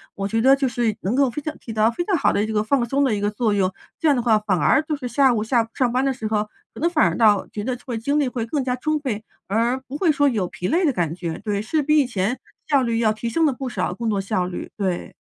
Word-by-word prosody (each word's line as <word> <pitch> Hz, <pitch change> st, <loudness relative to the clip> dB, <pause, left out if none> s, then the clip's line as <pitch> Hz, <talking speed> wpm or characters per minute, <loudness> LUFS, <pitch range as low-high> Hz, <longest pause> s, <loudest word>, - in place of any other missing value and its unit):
我 195 Hz, 0 st, -2 dB
觉 225 Hz, +2 st, 0 dB
得 265 Hz, +3 st, +6 dB
就 275 Hz, -1 st, 0 dB
是 235 Hz, -3 st, 0 dB
能 200 Hz, +6 st, -1 dB
够 275 Hz, -1 st, +3 dB
非 245 Hz, -, -5 dB
常 310 Hz, +1 st, -5 dB
起 230 Hz, -, -8 dB
到 220 Hz, +1 st, +2 dB
非 345 Hz, -, -2 dB
常 385 Hz, -5 st, +1 dB
好 -, -, +2 dB
的 205 Hz, -, +1 dB
一 -, -, -2 dB
个 210 Hz, -1 st, +1 dB
放 260 Hz, +3 st, +1 dB
松 275 Hz, +4 st, +1 dB
的 260 Hz, -5 st, +2 dB
一 -, -, -2 dB
个 205 Hz, +1 st, 0 dB
作 215 Hz, 0 st, 0 dB
用， 190 Hz, -2 st, +1 dB, 0.3 s
这 320 Hz, -, +1 dB
样 290 Hz, -, +5 dB
的 245 Hz, -, 0 dB
话， 220 Hz, -3 st, +4 dB
反 210 Hz, -3 st, 0 dB
而 275 Hz, -, +4 dB
就 310 Hz, 0 st, -2 dB
是 270 Hz, -3 st, -8 dB
下 265 Hz, 0 st, +3 dB
午 215 Hz, -2 st, 0 dB
下 225 Hz, 0 st, +1 dB
上 250 Hz, -3 st, +1 dB
班 255 Hz, +2 st, +1 dB
的 270 Hz, -, +1 dB
时 245 Hz, -4 st, -7 dB
候， 215 Hz, -1 st, +1 dB, 0.3 s
可 -, -, -10 dB
能 335 Hz, -, +2 dB
反 320 Hz, -3 st, +3 dB
而 -, -, -4 dB
倒 210 Hz, -4 st, +4 dB
觉 210 Hz, -, -4 dB
得 250 Hz, +2 st, -2 dB
会 245 Hz, -4 st, -3 dB
精 280 Hz, +6 st, 0 dB
力 285 Hz, -, +1 dB
会 235 Hz, -2 st, -3 dB
更 275 Hz, +4 st, -2 dB
加 250 Hz, -1 st, -1 dB
充 310 Hz, +4 st, 0 dB
沛， 230 Hz, -7 st, -3 dB, 0.3 s
而 230 Hz, +5 st, +1 dB
不 265 Hz, +2 st, -7 dB
会 345 Hz, +1 st, +2 dB
说 285 Hz, 0 st, +3 dB
有 210 Hz, -7 st, -1 dB
疲 180 Hz, -, -5 dB
累 345 Hz, +3 st, +2 dB
的 285 Hz, -, +2 dB
感 170 Hz, -5 st, -1 dB
觉。 170 Hz, -2 st, -5 dB
对， 205 Hz, -2 st, -1 dB
是 300 Hz, +8 st, 0 dB
比 305 Hz, +2 st, +3 dB
以 275 Hz, -, +3 dB
前 225 Hz, +1 st, -2 dB, 0.3 s
效 280 Hz, -3 st, +3 dB
率 230 Hz, -1 st, 0 dB
要 220 Hz, -2 st, +3 dB
提 215 Hz, +2 st, -4 dB
升 325 Hz, +8 st, +2 dB
了 295 Hz, -, +3 dB
不 260 Hz, +1 st, -5 dB
少 180 Hz, -6 st, -2 dB
工 230 Hz, +3 st, -3 dB
作 200 Hz, -2 st, 0 dB
效 190 Hz, -2 st, -1 dB
率， 180 Hz, -, -6 dB
对。 190 Hz, -4 st, -2 dB
235 Hz, 325 characters per minute, -22 LUFS, 210-275 Hz, 0.3 s, 得